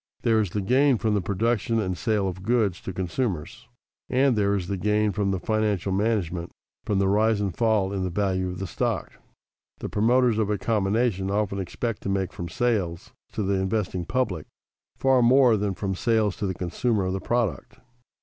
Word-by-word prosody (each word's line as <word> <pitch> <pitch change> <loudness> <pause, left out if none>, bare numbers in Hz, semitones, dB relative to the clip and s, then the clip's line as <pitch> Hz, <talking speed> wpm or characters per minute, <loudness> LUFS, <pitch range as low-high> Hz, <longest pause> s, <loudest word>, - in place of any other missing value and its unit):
There 115 -1 +3
is 105 -4 0
the 105 +4 -2
gain 130 +6 +3
from 110 +1 0
the 105 - +1
production 115 +4 0
and 95 -4 -1
sale 105 0 0
of 95 0 -5
goods 105 -4 +1
to - - -5
consumers, 90 - -3 0.4
and 130 0 +3
there 100 -1 +2
is 90 -3 -3
the 100 - -2
gain 105 +2 +1
from 100 -1 -1
the 95 -1 -1
financial 105 -3 0
management, 95 -4 -1 0.4
from 105 - 0
the 95 0 +2
rise 105 +2 +2
and 100 -5 -2
fall 110 -4 +1
in 95 -1 -2
the 90 - -1
value 95 0 0
of 90 +2 -5
stock. - - -2 0.7
The - - -6
promoters 120 +1 +3
of 105 -2 0
a 105 - +1
combination 100 -1 0
often 100 -1 -1
expect 105 +4 -3
to - - -4
make 95 -2 -1
from 85 -1 -6
sales 100 -7 -1 0.2
to 110 - -2
the 100 +1 0
investing 95 -3 -1
public 95 -9 -1 0.5
far 135 -1 +3
more 125 0 +5
than 100 -2 -1
from 95 +1 -2
sales 110 0 +1
to 105 -3 -2
the 95 - -3
consumer 100 +4 -1
of 95 - -1
the 95 - -3
product. 120 -5 -2
100 Hz, 190 wpm, -25 LUFS, 95-115 Hz, 0.7 s, more